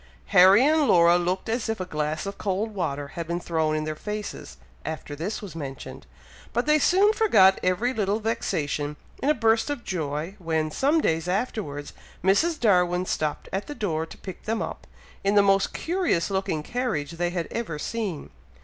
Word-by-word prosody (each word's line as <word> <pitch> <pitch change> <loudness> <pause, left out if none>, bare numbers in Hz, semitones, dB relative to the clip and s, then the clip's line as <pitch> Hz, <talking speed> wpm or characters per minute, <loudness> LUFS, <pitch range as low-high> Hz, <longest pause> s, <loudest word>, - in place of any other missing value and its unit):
Harry 195 +7 +8
and 305 -1 +3
Laura 170 0 +6
looked 180 +2 -2
as 225 0 -1
if 225 - -2
a 185 - -2
glass 155 -2 -2
of 200 0 -6
cold 210 +3 -1
water 145 -7 -3
had 170 +1 -6
been 170 +1 -2
thrown 160 -3 0
in 155 - -1
their 155 0 -3
faces, 210 +4 -6 0.3
after 155 -1 -5
this 185 +9 -4
was 185 -6 -8
mentioned; 135 -4 -7 0.5
but 240 +2 0
they 305 +1 +4
soon 390 +7 +4
forgot 195 - +5
every 200 +8 +1
little 210 -2 0
vexation, 150 -10 -2 0.3
in 280 - +1
a - - +6
burst 225 +2 +2
of 285 -5 -3
joy, 160 0 -3
when, 160 -3 -1
some 295 - +2
days 165 - 0
afterwards, 180 - -3 0.3
Mrs. 310 - +3
Darwin 180 -4 +3
stopped 155 -4 -2
at 195 +2 -2
the 295 - -6
door 165 - -2
to - - -12
pick 190 - -9
them 225 +1 -1
up, - - -5 0.4
in 200 +1 +2
the 205 - +6
most 195 0 +3
curious 335 - 0
looking 190 -5 -1
carriage 190 - -2
they 175 +1 -1
had 175 -1 -3
ever 215 -10 -3
seen. 190 - -4
190 Hz, 185 wpm, -25 LUFS, 160-225 Hz, 0.5 s, Harry